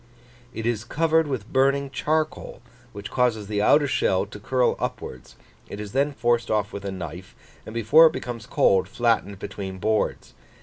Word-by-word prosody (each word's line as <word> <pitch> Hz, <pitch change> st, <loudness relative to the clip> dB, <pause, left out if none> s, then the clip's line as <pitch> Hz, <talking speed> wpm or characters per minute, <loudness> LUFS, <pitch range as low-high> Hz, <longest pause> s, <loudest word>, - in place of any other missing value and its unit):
"It 115 Hz, -2 st, -6 dB
is 115 Hz, -2 st, -1 dB
covered 160 Hz, +4 st, +1 dB
with 125 Hz, -6 st, -5 dB
burning 140 Hz, +1 st, +2 dB
charcoal, 155 Hz, -1 st, -2 dB, 0.3 s
which 100 Hz, -2 st, -8 dB
causes 120 Hz, -4 st, +1 dB
the 105 Hz, 0 st, -2 dB
outer 145 Hz, +7 st, +5 dB
shell 95 Hz, -7 st, +1 dB
to 105 Hz, +1 st, -11 dB
curl 125 Hz, +4 st, +1 dB
upwards, 65 Hz, -, -6 dB, 0.3 s
it 100 Hz, -, -7 dB
is 105 Hz, -1 st, -6 dB
then 140 Hz, +3 st, +1 dB
forced 120 Hz, -3 st, 0 dB
off 105 Hz, -1 st, 0 dB
with 100 Hz, -, -6 dB
a 100 Hz, -, -3 dB
knife, 90 Hz, 0 st, -8 dB, 0.3 s
and 110 Hz, -, -8 dB
before 145 Hz, +9 st, +6 dB
it 160 Hz, -, -1 dB
becomes 120 Hz, -1 st, -6 dB
cold 95 Hz, -6 st, +3 dB
flattened 115 Hz, -3 st, 0 dB
between 95 Hz, -1 st, -6 dB
boards. 110 Hz, +3 st, -1 dB
115 Hz, 170 wpm, -24 LUFS, 100-135 Hz, 0.3 s, before